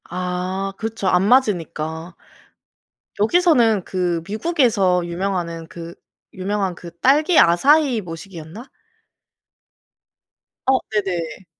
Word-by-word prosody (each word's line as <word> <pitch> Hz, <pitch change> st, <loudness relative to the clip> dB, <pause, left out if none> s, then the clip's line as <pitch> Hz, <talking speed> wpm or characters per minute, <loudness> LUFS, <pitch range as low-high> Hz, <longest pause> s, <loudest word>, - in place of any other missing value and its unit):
아 185 Hz, +2 st, -3 dB
그쵸. 225 Hz, -2 st, -4 dB
안 180 Hz, 0 st, +3 dB
맞으니까. 170 Hz, -, 0 dB, 1.0 s
여기서는 235 Hz, -, +3 dB
그 175 Hz, -3 st, -2 dB
미국에서 215 Hz, -, +1 dB
유명하는 170 Hz, -2 st, -3 dB
그 170 Hz, -1 st, -9 dB, 0.4 s
유명한 195 Hz, -1 st, -2 dB
그 170 Hz, 0 st, -11 dB
딸기 305 Hz, +6 st, +3 dB
아사이 265 Hz, -, +4 dB
뭐시기였나? 175 Hz, -, -10 dB, 2.0 s
어 265 Hz, 0 st, +4 dB
네네. 185 Hz, -5 st, -3 dB
190 Hz, 200 characters per minute, -20 LUFS, 170-225 Hz, 2.0 s, 아사이